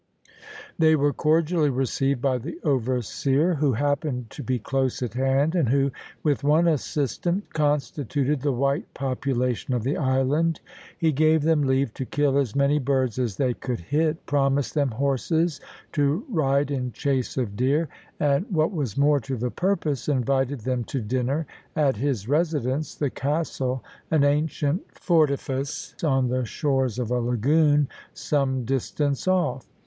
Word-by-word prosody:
They 160 -1 +5
were 145 -1 +2
cordially 160 0 +2
received 135 0 0
by 130 -2 +2
the 150 +8 -7
overseer, 135 - +1
who 145 -3 +1
happened 140 -2 -1
to - - -8
be 130 -1 -1
close 130 +2 -1
at 115 -4 -4
hand, 135 +4 +1
and 165 -10 +2
who, 140 +1 +2 0.3
with 145 -3 +1
one 155 +4 +4
assistant, 165 - -1
constituted 145 -1 0
the 145 0 +1
white 140 +3 -1
population 130 -2 -1
of 120 - -1
the 135 +5 0
island. 140 +4 +1 0.4
He 160 -1 +2
gave 155 +1 +3
them 160 -1 +3
leave 130 -3 +1
to 130 - -4
kill 140 +1 +1
as 125 -7 -1
many 140 +1 +3
birds 130 -3 0
as 115 -6 -1
they 130 -3 +1
could 125 -2 -4
hit, 155 - -1
promised 140 -1 +1
them 145 -3 +1
horses 140 +6 0 0.3
to 145 +6 +1
ride 145 - +1
in 125 -3 -2
chase 135 -4 -1
of 115 -6 -2
deer, 140 +8 +1 0.3
and, 145 +6 +2
what 160 -3 +1
was 145 - -3
more 145 +1 +4
to 130 +1 -4
the 120 +2 -2
purpose, 165 -8 -1
invited 135 -1 0
them 125 +1 -1
to 135 - -3
dinner 130 +7 -1 0.3
at 145 -7 +2
his 120 -4 -1
residence, 150 -2 0
the 145 -4 -1
castle, 135 -3 -2 0.3
an 155 -3 +3
ancient 150 +2 +1 0.2
fortalice 140 -4 0
on 135 -4 +2
the 130 +1 0
shores 130 -1 0
of 125 -2 -2
a 125 - +2
lagoon 145 +5 +3 0.3
some 130 -4 0
distance 135 +4 -1
off. 160 -9 +1
140 Hz, 155 wpm, -25 LUFS, 130-150 Hz, 0.4 s, They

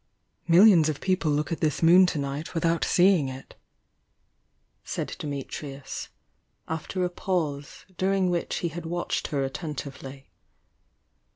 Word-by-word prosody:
"Millions 170 -2 +6
of 150 - -3
people 185 -4 0
look 150 +1 0
at 165 - -2
this 155 0 0
moon 180 +3 +7
to 175 - -2
night 140 +3 -4
without 165 0 +1
seeing 175 -6 +4
it," 130 +1 -10 1.3
said - - -4
Dimitrius, 140 -1 -6 0.6
after 160 +3 -3
a - - -1
pause, 155 -7 -3
during 190 -1 +2
which 170 -1 -2
he - - 0
had 165 +1 -7
watched 175 +1 -2
her 140 -2 -1
attentively. 135 -2 -7
160 Hz, 125 wpm, -26 LUFS, 140-175 Hz, 1.3 s, moon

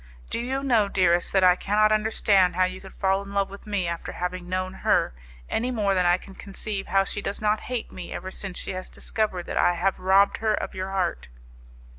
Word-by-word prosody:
Do - - -1
you 265 +3 -2
know, 230 -6 +3
dearest, 175 -3 +2
that 190 -1 +3
I 180 -1 +7
cannot 210 +3 +2
understand 210 -4 +3
how 185 - +3
you 185 0 -2
could 190 - -13
fall 195 0 +1
in 200 0 -9
love 200 -1 +1
with 200 +2 -11
me 200 -4 -1
after 170 0 -4
having 180 0 -4
known 185 0 -2
her, - - +2 0.3
any 245 +3 -1
more 210 -5 +1
than 180 -2 +2
I 175 +1 +4
can 195 - -13
conceive 200 +1 -5
how 195 +1 +3
she 205 - -4
does 200 - -3
not 215 0 +1
hate 250 -3 -3
me 180 - -8
ever 190 - -5
since 190 -1 -5
she - - -4
has 185 0 -6
discovered 210 -5 -2
that - - -4
I 175 - +4
have 190 +3 0
robbed 195 +2 +4
her 220 -1 +1
of - - -4
your 190 0 -4
heart. 185 - -1
195 Hz, 225 wpm, -25 LUFS, 185-210 Hz, 0.3 s, I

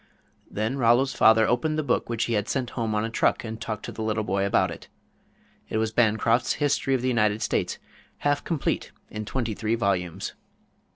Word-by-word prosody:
Then 110 +6 -2
Rollo's 120 +3 +4
father 110 0 +5
opened 155 +7 +1
the 155 - 0
book 125 - 0
which 115 -1 0
he 120 - -1
had 105 -2 0
sent 130 -3 -1
home 115 -3 -2
on 105 +1 +1
a - - -3
truck - - +1
and 110 -1 -6
talked 110 -2 -4
to - - -6
the - - -7
little 110 0 0
boy 100 0 0
about - - +2
it. - - -10 0.8
It - - -1
was 110 0 0
Bancroft's 115 +1 +2
History 140 -2 +1
of 125 - -2
the - - +1
United 110 -3 +2
States, - - -1 0.4
half 145 0 0
complete 160 -5 -2 0.2
in 105 0 -5
twenty 115 0 -2
three 110 +2 -1
volumes. 95 -7 -1
115 Hz, 195 wpm, -26 LUFS, 110-125 Hz, 0.8 s, father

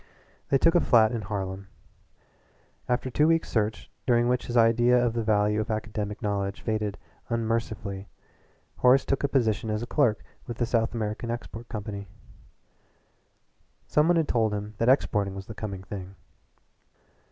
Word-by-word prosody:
They 135 - +4
took 165 +4 +4
a 175 - +4
flat 115 -5 +5
in 115 -2 -2
Harlem. 100 -1 -4 1.2
After 125 +1 0
two 150 +5 +3
weeks' 165 0 +2
search, 110 -1 -1 0.2
during 120 -1 +4
which 125 0 0
his 120 - -1
idea 120 +2 +5
of 120 -2 +2
the 115 - -1
value 105 -1 +2
of 110 - -5
academic 110 0 -3
knowledge 100 -1 -2
faded 110 -2 -2 0.3
unmercifully, 110 -4 -2 0.7
Horace 130 +2 +5
took 135 - -1
a - - +3
position 115 -6 +1
as 105 +2 -1
clerk 120 -5 +1 0.2
with 120 - -6
a 120 - +2
South 115 -1 0
American 110 +1 -3
export 120 0 -6
company 100 -2 -5 1.8
some 150 +1 +3
one 175 0 +4
had 160 -2 +2
told 110 -3 +1
him 105 +1 -5
that 115 - +3
exporting 105 -7 +2
was 95 0 -7
the 110 - -8
coming 100 -3 -6
thing. 95 0 -8
110 Hz, 155 wpm, -27 LUFS, 105-120 Hz, 1.8 s, flat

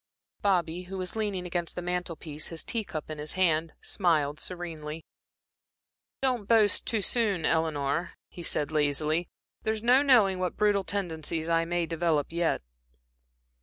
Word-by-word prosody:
Bobby, 180 -3 +1
who 190 +1 -6
was 185 +1 -3
leaning 205 -4 -2
against 175 -1 -2
the 180 - -3
mantel 180 -1 -1
piece 155 -1 -4
his 165 -1 -4
tea 230 -2 -2
cup 155 -6 -6
in 155 - -5
his 150 0 -4
hand, 165 -3 +2
smiled 155 -6 +1
serenely. 165 -3 -6 1.2
"Don't 250 -6 +1
boast 215 -3 +4
too 220 -3 +1
soon, 205 -9 +1
Eleanor," 160 0 0
he 175 - -10
said, 150 -3 0
lazily, 155 +3 +1 0.3
"there's 220 0 -2
no 250 +3 +6
knowing 220 -10 +5
what 180 -2 -2
brutal 205 -2 +3
tendencies 165 -5 -2
I 165 0 +2
may 175 0 0
develop 165 -3 0
yet." 170 - 0
175 Hz, 150 wpm, -28 LUFS, 160-195 Hz, 1.2 s, no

